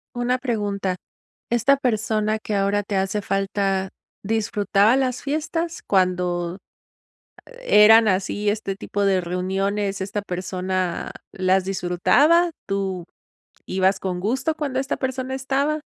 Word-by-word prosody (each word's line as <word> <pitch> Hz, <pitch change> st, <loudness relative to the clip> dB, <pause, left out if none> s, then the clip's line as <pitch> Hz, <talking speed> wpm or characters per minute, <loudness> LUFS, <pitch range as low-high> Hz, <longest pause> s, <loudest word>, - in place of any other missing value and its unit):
Una 245 Hz, +1 st, 0 dB
pregunta, 205 Hz, -6 st, -2 dB, 0.5 s
esta 240 Hz, +4 st, +3 dB
persona 220 Hz, -4 st, 0 dB
que 215 Hz, -1 st, -3 dB
ahora 200 Hz, +1 st, +1 dB
te 200 Hz, 0 st, -4 dB
hace 195 Hz, +2 st, 0 dB
falta, 195 Hz, -1 st, -1 dB, 0.3 s
¿disfrutaba 210 Hz, 0 st, +2 dB
las 255 Hz, -2 st, 0 dB
fiestas? 320 Hz, +3 st, -3 dB
Cuando 180 Hz, -1 st, 0 dB, 1.0 s
eran 220 Hz, -, +7 dB
así 200 Hz, +2 st, 0 dB
este 205 Hz, -2 st, -2 dB
tipo 200 Hz, +1 st, -3 dB
de 195 Hz, -2 st, +3 dB
reuniones, 195 Hz, +3 st, -2 dB
esta 200 Hz, +2 st, -3 dB
persona 185 Hz, -1 st, -3 dB, 0.2 s
las 185 Hz, 0 st, +1 dB
disfrutaba, 195 Hz, -, +3 dB, 0.2 s
tú 195 Hz, -3 st, -2 dB, 0.6 s
ibas 190 Hz, +1 st, +1 dB
con 180 Hz, -2 st, -3 dB
gusto 255 Hz, -, 0 dB
cuando 280 Hz, -4 st, -2 dB
esta 270 Hz, -, -2 dB
persona 260 Hz, 0 st, -3 dB
estaba. 275 Hz, +3 st, 0 dB
200 Hz, 115 wpm, -22 LUFS, 190-245 Hz, 1.0 s, eran